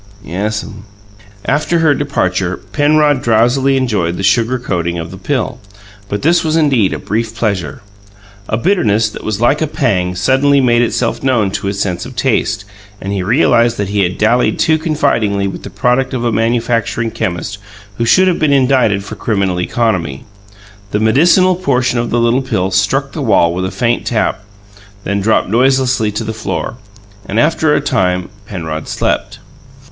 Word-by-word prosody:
"Yes'm." 105 +3 -4 0.6
After 150 +4 +1
her 160 -3 +3
departure 95 -11 -1
Penrod 145 +6 +1
drowsily 120 +4 +2
enjoyed 100 -10 -1
the 95 - -4
sugar 115 +5 +2
coating 85 -7 -2
of 80 0 -6
the 95 - -9
pill; 130 +2 -2 0.5
but 100 - -3
this 170 +4 +3
was 160 -1 0
indeed 135 -11 +2
a - - -2
brief 110 +2 -3
pleasure. 100 -4 -2 0.7
A 110 - 0
bitterness 115 - +1
that - - -9
was 110 -2 -2
like 120 +6 +2
a 160 - +1
pang 95 - -1
suddenly 135 +8 +3
made 120 -2 +3
itself 120 - -1
known 120 -7 +1
to 100 - -3
his 100 0 -3
sense 90 -3 -2
of 130 - -11
taste, 110 -4 0 0.3
and 100 +1 -4
he 100 - -1
realized 120 - +2
that 100 -2 -2
he 100 0 -1
had 90 -1 -1
dallied 115 +4 +2
too 160 0 +2
confidingly 135 - 0
with 95 - -6
the - - -8
product 125 +2 0
of 120 -1 -2
a 120 - +1
manufacturing 115 0 0
chemist 95 -1 -4 0.4
who - - +1
should 185 +11 +4
have 180 - +1
been 155 -2 +2
indicted 130 -7 +2
for 105 - -8
criminal 100 -4 -1
economy. 90 - -1 0.6
The 105 - -1
medicinal 170 - +4
portion 130 -8 0
of 120 - -2
the 120 - +1
little 120 +3 +2
pill 95 -8 -1
struck 135 +9 +1
the 155 - -5
wall 100 -9 +3
with 90 +1 -2
a - - -2
faint 120 -1 -1
tap, 110 -2 -1 0.6
then 100 0 -1
dropped 110 +3 +2
noiselessly 130 -1 +2
to 105 - -3
the 110 - -4
floor, 110 +1 -4 0.5
and, 105 +3 -1
after 155 0 +2
a - - +1
time, 95 -10 0 0.2
Penrod 80 -6 -5
slept. - - -2
115 Hz, 170 wpm, -15 LUFS, 100-135 Hz, 0.7 s, should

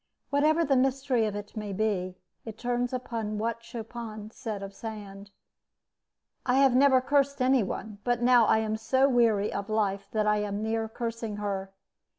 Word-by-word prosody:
Whatever 310 +4 +3
the 275 - +2
mystery 260 -3 +2
of 205 - -4
it 205 +2 -7
may 210 -2 -4
be, 185 -3 -1 0.3
it 220 -1 -8
turns 245 +1 -1
upon 230 -4 -3
what 230 +2 -2
Chopin 225 -2 -7
said 215 -4 -5
of 195 0 -7
Sand: 205 -2 -8 1.1
"I 250 - +1
have 270 -2 +5
never 265 -1 +5
cursed 280 +1 +1
any 260 0 +4
one, 205 +1 -5
but 245 -1 +1
now 240 -2 +5
I - - +4
am 220 0 -1
so 260 +5 +2
weary 230 -6 +2
of 200 +1 -4
life 200 -2 0
that 215 -1 +1
I 210 0 +3
am 205 0 -2
near 225 0 -1
cursing 230 -2 -4
her. 195 -2 -3
225 Hz, 170 wpm, -28 LUFS, 210-250 Hz, 1.1 s, have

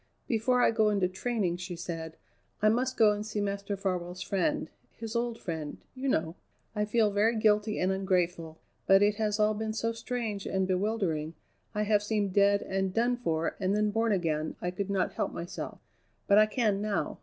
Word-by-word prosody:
"Before 245 +2 +2
I - - +5
go 220 -1 +3
into 200 -3 +2
training," 190 -2 -1
she 180 0 -6
said, 165 -1 -6 0.4
"I 215 - +4
must 255 +3 0
go 215 -2 +6
and 210 0 -2
see 215 -1 -4
Master 200 0 -2
Farwell's 185 -2 -3
friend 295 +10 -1 0.3
his 225 0 -6
old 235 -1 -1
friend, 160 -6 -5 0.2
you 265 +1 -4
know. 160 -5 0 0.4
I 210 0 +1
feel 215 0 +2
very 215 +3 +2
guilty 215 0 +2
and 185 +1 +2
ungrateful, 180 -4 -1 0.3
but 195 +1 +6
it 205 0 +2
has 215 -1 0
all 215 0 +4
been 220 +1 -3
so 230 +1 -1
strange 230 -3 -4
and 190 -1 0
bewildering, 185 -5 -1 0.4
I 210 - +1
have 210 -1 +3
seemed 205 -2 -1
dead 200 0 +4
and 190 0 -1
done 240 +4 +2
for 165 -9 -1
and 195 0 +1
then 210 0 +1
born 225 +1 +1
again, 160 -5 0
I 175 - -2
could 195 +2 -4
not 195 -2 0
help - - -2
myself; 170 +1 -6 0.5
but 200 0 +6
I 215 - +6
can 215 -3 +1
now. 210 -4 -2
205 Hz, 190 wpm, -29 LUFS, 185-220 Hz, 0.5 s, go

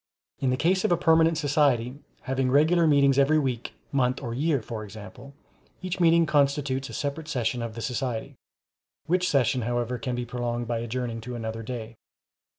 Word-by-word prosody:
In 135 - +1
the 130 - +1
case 185 +6 +2
of - - +1
a 175 - +4
permanent 165 -1 +4
society, 140 -5 +2 0.3
having 130 -1 -1
regular 160 +5 +4
meetings 140 -2 +4
every 145 +3 +4
week, 130 -5 -2 0.2
month, 130 -2 +1
or 120 -4 -5
year, 145 +3 +1
for 110 -2 -6
example, 110 +7 -11 0.5
each 185 0 -3
meeting 170 -1 +5
constitutes 140 -2 +1
a - - -9
separate 150 +2 -4
session 125 -5 -1
of 115 -2 -5
the 115 - -6
society, 125 -2 -3 0.7
which 180 +2 +1
session 130 -2 +2
however 120 +1 -2
can 125 +1 -3
be 120 0 -3
prolonged 120 0 -3
by 115 -1 -1
adjourning 120 0 -4
to 125 +2 -6
another 115 -1 -4
day. 115 -1 -7
130 Hz, 175 wpm, -26 LUFS, 120-150 Hz, 0.7 s, meeting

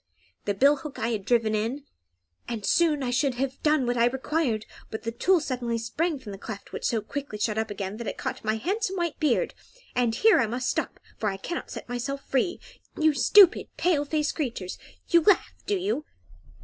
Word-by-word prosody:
The 205 - 0
bill 280 +7 +5
hook 290 +1 -8
I 230 - -1
had 215 -4 -2
driven 230 -3 +2
in, 230 +7 -1 0.6
and 225 -4 -4
soon 310 -5 +3
I 245 - -1
should 255 +1 +1
have 265 +1 -3
done 300 -3 +3
what 245 0 0
I 235 - +5
required; 265 -3 -1 0.2
but 220 - -6
the 230 - -2
tool 355 +10 +3
suddenly 245 -6 -2
sprang 295 +8 -1
from 250 -6 -9
the 195 - -8
cleft, 200 -1 -8
which - - -4
so 225 -2 +1
quickly 270 0 -5
shut 210 0 0
up 220 0 -2
again 200 0 -4
that 235 - -6
it - - -4
caught - - -4
my 215 0 +1
handsome 380 - -1
white 345 -4 -2
beard; 300 -7 +1 0.4
and 240 -2 +2
here 435 - +5
I 240 - +2
must 250 +3 -1
stop, - - -3 0.2
for 215 - +1
I 195 - -4
cannot 345 - -5
set - - -7
myself 255 +3 -4
free. 275 +7 0 0.4
You 310 -1 +4
stupid, 370 +6 +6
pale 335 -5 +2
faced 300 0 0
creatures! 235 - -4 0.3
You 340 -1 +6
laugh, 385 +2 +3
do 410 - +1
you?" 370 -4 -1
255 Hz, 205 wpm, -27 LUFS, 225-310 Hz, 0.6 s, stupid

